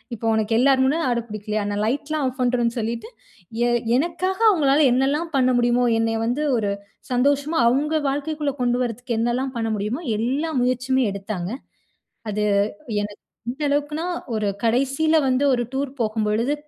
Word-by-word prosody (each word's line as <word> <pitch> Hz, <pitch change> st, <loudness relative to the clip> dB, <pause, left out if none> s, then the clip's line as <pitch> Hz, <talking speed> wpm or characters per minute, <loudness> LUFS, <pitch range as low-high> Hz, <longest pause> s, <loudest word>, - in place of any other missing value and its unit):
இப்ப 230 Hz, -, -7 dB
உனக்கு 220 Hz, 0 st, 0 dB
எல்லார் 265 Hz, 0 st, +4 dB
முன்ன 305 Hz, +5 st, +1 dB
ஆட 240 Hz, -, +1 dB
பிடிக்கலையா, 215 Hz, 0 st, -3 dB
நான் 205 Hz, +1 st, -1 dB
லைட்லாம் 290 Hz, +4 st, -1 dB
ஆஃப் 260 Hz, +1 st, -6 dB
பண்றோன்னு 245 Hz, -1 st, +1 dB
சொல்லிட்டு, 230 Hz, -, -3 dB, 0.6 s
எ -, -, +2 dB, 0.3 s
எனக்காக 350 Hz, +5 st, -1 dB
அவங்களால, 295 Hz, -4 st, +3 dB
என்னலாம் 290 Hz, +6 st, 0 dB
பண்ண 255 Hz, -1 st, +3 dB
முடியுமோ, 240 Hz, +1 st, +2 dB, 0.2 s
என்னைய 225 Hz, 0 st, 0 dB
வந்து 245 Hz, +6 st, -1 dB
ஒரு 205 Hz, -3 st, 0 dB, 0.4 s
சந்தோஷமா, 285 Hz, +5 st, +1 dB
அவங்க 300 Hz, +5 st, +1 dB
வாழ்க்கைக்குள்ள 290 Hz, 0 st, -2 dB
கொண்டு 245 Hz, 0 st, +2 dB
வரதுக்கு 240 Hz, 0 st, -3 dB
என்னலாம் 250 Hz, +3 st, -1 dB
பண்ண 225 Hz, -1 st, -1 dB
முடியுமோ, 210 Hz, +9 st, -3 dB, 0.2 s
எல்லா 275 Hz, +8 st, -1 dB
முயற்சியுமே 255 Hz, +1 st, +1 dB
எடுத்தாங்க. 195 Hz, -2 st, -4 dB, 0.8 s
அது 210 Hz, 0 st, -1 dB, 0.6 s
எனக்கு, 205 Hz, 0 st, -7 dB, 0.3 s
எந்த 270 Hz, +5 st, -11 dB
அளவுக்குனா, 295 Hz, +3 st, -1 dB, 0.3 s
ஒரு 215 Hz, -1 st, 0 dB, 0.2 s
கடைசியில 275 Hz, +7 st, +2 dB
வந்து, 260 Hz, +1 st, +2 dB
ஒரு 240 Hz, -, -1 dB
டூர் 275 Hz, 0 st, -2 dB
போகும்பொழுது 220 Hz, +3 st, 0 dB
255 Hz, 150 wpm, -22 LUFS, 225-285 Hz, 0.8 s, எல்லார்